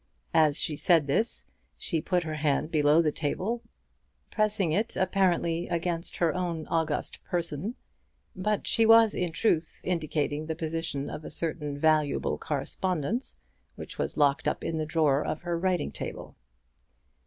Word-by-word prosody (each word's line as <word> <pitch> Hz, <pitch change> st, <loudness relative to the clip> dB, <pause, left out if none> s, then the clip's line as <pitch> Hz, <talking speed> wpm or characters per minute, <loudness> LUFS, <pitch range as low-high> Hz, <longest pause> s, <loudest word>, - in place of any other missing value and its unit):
As 155 Hz, -2 st, +4 dB
she 150 Hz, -, 0 dB
said 155 Hz, +1 st, +4 dB
this 215 Hz, -, 0 dB, 0.3 s
she 165 Hz, -4 st, -2 dB
put 180 Hz, 0 st, 0 dB
her 155 Hz, -1 st, -4 dB
hand 150 Hz, 0 st, 0 dB
below 150 Hz, +1 st, +4 dB
the 155 Hz, -, +2 dB
table, 190 Hz, +11 st, -2 dB, 0.7 s
pressing 210 Hz, -5 st, +1 dB
it 215 Hz, +8 st, 0 dB
apparently 175 Hz, -3 st, +1 dB
against 170 Hz, 0 st, -2 dB
her 170 Hz, -2 st, +1 dB
own 170 Hz, -3 st, -2 dB
august 165 Hz, -1 st, -1 dB
person; 170 Hz, -, -2 dB, 0.6 s
but 205 Hz, +2 st, -1 dB
she 230 Hz, -, +3 dB
was 225 Hz, -1 st, +7 dB
in 180 Hz, -2 st, -1 dB
truth 165 Hz, -2 st, 0 dB
indicating 155 Hz, -3 st, -1 dB
the 160 Hz, -, -2 dB
position 160 Hz, -3 st, -3 dB
of 155 Hz, -, -6 dB
a -, -, -7 dB
certain 150 Hz, -3 st, -3 dB
valuable 155 Hz, -1 st, +2 dB
correspondence, 185 Hz, -, -2 dB, 0.4 s
which -, -, -9 dB
was -, -, -2 dB
locked 145 Hz, -1 st, +3 dB
up -, -, -1 dB
in 160 Hz, -1 st, -2 dB
the 155 Hz, -, -2 dB
drawer 150 Hz, -3 st, +2 dB
of 155 Hz, -, -3 dB
her 175 Hz, -1 st, -1 dB
writing 180 Hz, +1 st, 0 dB
table. -, -, -6 dB
165 Hz, 150 wpm, -28 LUFS, 155-185 Hz, 0.7 s, was